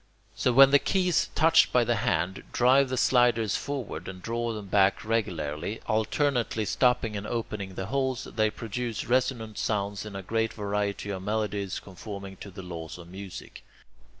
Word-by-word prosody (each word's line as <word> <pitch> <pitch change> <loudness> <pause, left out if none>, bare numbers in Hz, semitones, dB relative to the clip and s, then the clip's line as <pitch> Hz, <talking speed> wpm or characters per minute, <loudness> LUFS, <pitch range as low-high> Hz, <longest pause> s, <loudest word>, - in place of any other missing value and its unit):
So, 125 - +1
when 135 +2 +8
the 145 - +7
keys, 180 0 +1
touched 160 +1 +5
by 125 - +4
the 120 0 +1
hand, 90 0 0
drive 130 +2 +4
the 130 - -2
sliders 120 -5 +3
forward 140 -6 -4
and 95 -1 -7
draw 115 +4 -2
them 105 -2 -6
back 100 +1 +2
regularly, 90 -4 -2
alternately 115 0 0
stopping 120 -2 +2
and 100 +1 -4
opening 105 -5 -4
the 95 - -3
holes, 130 +1 -1
they 110 -1 0
produce 115 +1 -4
resonant 120 -3 0
sounds 100 -1 -1
in 105 -2 -8
a 95 - -5
great 115 +3 -1
variety 100 -1 -2
of 95 -2 -4
melodies 105 -2 -2
conforming 100 0 -8
to 100 - -9
the 95 0 -9
laws 85 -3 -7
of 85 -1 -12
music. 95 0 -9
110 Hz, 165 wpm, -28 LUFS, 100-120 Hz, -, when